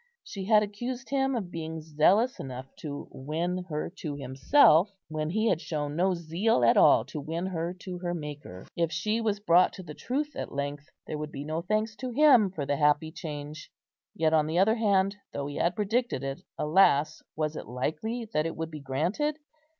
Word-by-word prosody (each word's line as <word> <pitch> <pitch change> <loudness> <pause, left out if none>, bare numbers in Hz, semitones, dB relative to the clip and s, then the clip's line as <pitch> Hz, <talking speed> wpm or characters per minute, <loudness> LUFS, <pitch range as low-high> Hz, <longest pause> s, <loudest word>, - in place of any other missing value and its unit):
She 195 -2 -6
had 210 0 +5
accused 240 +5 -5
him 270 -1 +1
of 195 -7 -4
being 160 -1 -5
zealous 170 - +2
enough 130 0 -7
to 145 -2 -6
win 170 +6 -3
her 155 +2 -3
to 150 -5 -4
himself, 150 - +4 0.2
when 155 0 -2
he 220 +6 +1
had 165 - +1
shown 145 -2 -3
no 185 +2 +2
zeal 170 - +1
at 115 - +5
all 115 - +6
to 145 +3 -6
win 165 +5 -3
her 170 -2 -2
to 180 -2 -6
her 175 -1 -2
Maker. 145 - -8
If 170 -1 0
she 210 +8 -1
was 210 -2 0
brought 180 -3 +4
to 185 - -9
the 155 -3 -8
truth 290 - -3
at - - -5
length, 140 +1 -4 0.2
there 150 - -5
would 150 0 -5
be 140 - -6
no 155 +2 -2
thanks 215 +4 -1
to 255 - -4
him 250 -5 +5
for 160 -6 -4
the 145 0 0
happy 150 +2 +2
change; 150 -1 -7 0.5
yet 160 -1 +2
on 155 -1 +3
the 160 +2 -1
other 200 +4 +5
hand, 200 -2 +2 0.2
though 140 - -3
he 145 0 -5
had 175 +1 +1
predicted 220 - 0
it, 135 0 -4 0.2
alas! 155 -2 +3
was 155 0 -1
it - - -7
likely 165 - -3
that 155 +1 +1
it 165 - -5
would 160 0 -4
be 155 - -7
granted? 175 - -1
165 Hz, 200 wpm, -28 LUFS, 150-205 Hz, 0.5 s, all